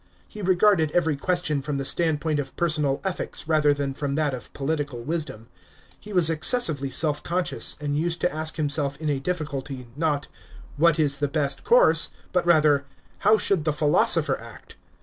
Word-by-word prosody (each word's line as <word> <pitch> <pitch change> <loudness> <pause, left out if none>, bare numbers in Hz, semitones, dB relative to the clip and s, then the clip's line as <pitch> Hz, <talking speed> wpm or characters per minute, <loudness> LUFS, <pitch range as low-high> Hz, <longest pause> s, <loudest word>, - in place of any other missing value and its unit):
He 210 - -10
regarded 185 -3 +3
every 160 -4 +1
question 155 -1 -1
from 140 +1 -3
the 135 - -3
standpoint 155 0 0
of 145 - -6
personal 150 -5 0
ethics 190 -4 -4
rather 155 -2 +3
than 140 -1 -2
from 140 0 -3
that 150 -2 0
of 125 - -8
political 145 -4 -3
wisdom. 150 -7 -4 0.5
He 210 - -12
wa^ 180 -5 +4
excessively 160 - +2
self 150 +2 +1
conscious, 175 +1 0
and 145 -1 -3
used 170 +3 0
to 180 - 0
ask 155 +1 -3
himself 145 -2 -1
in 155 -2 -1
a 140 - -1
difficulty, 140 -5 -4
not 150 -2 -1 0.3
" - - -18
What 165 +2 +3
is 145 -3 +2
the 145 - -1
best 140 -1 -2
course - - +4
V" - - -21 0.2
but - - 0
rather 150 -4 +4 0.4
"How 220 - +4
should 195 -6 +1
the 155 -1 0
philosopher 150 0 +2
act?" - - -13
150 Hz, 180 wpm, -24 LUFS, 140-170 Hz, 0.5 s, wa^